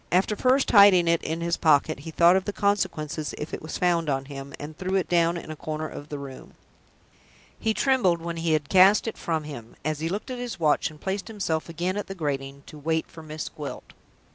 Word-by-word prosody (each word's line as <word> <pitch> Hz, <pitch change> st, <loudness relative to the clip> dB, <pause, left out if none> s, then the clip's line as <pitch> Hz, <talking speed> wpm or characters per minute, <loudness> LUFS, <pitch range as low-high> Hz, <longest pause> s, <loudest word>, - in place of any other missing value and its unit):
After 190 Hz, +4 st, +2 dB
first 260 Hz, +4 st, +2 dB
hiding 200 Hz, -4 st, +7 dB
it 170 Hz, 0 st, +3 dB
in 165 Hz, +1 st, -3 dB
his 170 Hz, 0 st, 0 dB
pocket, 145 Hz, -3 st, +3 dB
he 155 Hz, +3 st, -8 dB
thought 170 Hz, +2 st, +5 dB
of 190 Hz, 0 st, +1 dB
the -, -, -2 dB
consequences 155 Hz, -8 st, -1 dB
if 150 Hz, -, -6 dB
it -, -, -4 dB
was 155 Hz, -, -5 dB
found 170 Hz, -3 st, +1 dB
on 135 Hz, -1 st, -1 dB
him, 140 Hz, 0 st, -8 dB
and 150 Hz, +1 st, -7 dB
threw 185 Hz, +3 st, -2 dB
it 190 Hz, -, +1 dB
down 170 Hz, 0 st, +2 dB
in 165 Hz, -, -7 dB
a -, -, -6 dB
corner 155 Hz, +1 st, -4 dB
of 145 Hz, 0 st, -9 dB
the 145 Hz, -, -4 dB
room. 140 Hz, -2 st, -10 dB, 1.0 s
He 220 Hz, -1 st, 0 dB
trembled 240 Hz, -11 st, +2 dB
when 170 Hz, 0 st, -5 dB
he 165 Hz, -1 st, 0 dB
had 150 Hz, -2 st, 0 dB
cast 195 Hz, +5 st, +5 dB
it 225 Hz, -, -3 dB
from 160 Hz, -2 st, -2 dB
him, 120 Hz, -7 st, -9 dB
as 155 Hz, -1 st, -1 dB
he 160 Hz, +1 st, -2 dB
looked 205 Hz, +8 st, -4 dB
at 250 Hz, -, -5 dB
his 240 Hz, -6 st, -5 dB
watch 155 Hz, -3 st, +2 dB
and 155 Hz, -1 st, -15 dB
placed 195 Hz, +3 st, -3 dB
himself 185 Hz, -8 st, -2 dB
again 175 Hz, +4 st, -2 dB
at 205 Hz, -, -4 dB
the 195 Hz, -, -6 dB
grating 140 Hz, -4 st, -4 dB
to 150 Hz, -, -11 dB
wait 160 Hz, +2 st, 0 dB
for 160 Hz, -, -13 dB
Miss 155 Hz, 0 st, -6 dB
Gwilt. 150 Hz, -2 st, -8 dB
165 Hz, 230 wpm, -26 LUFS, 150-190 Hz, 1.0 s, hiding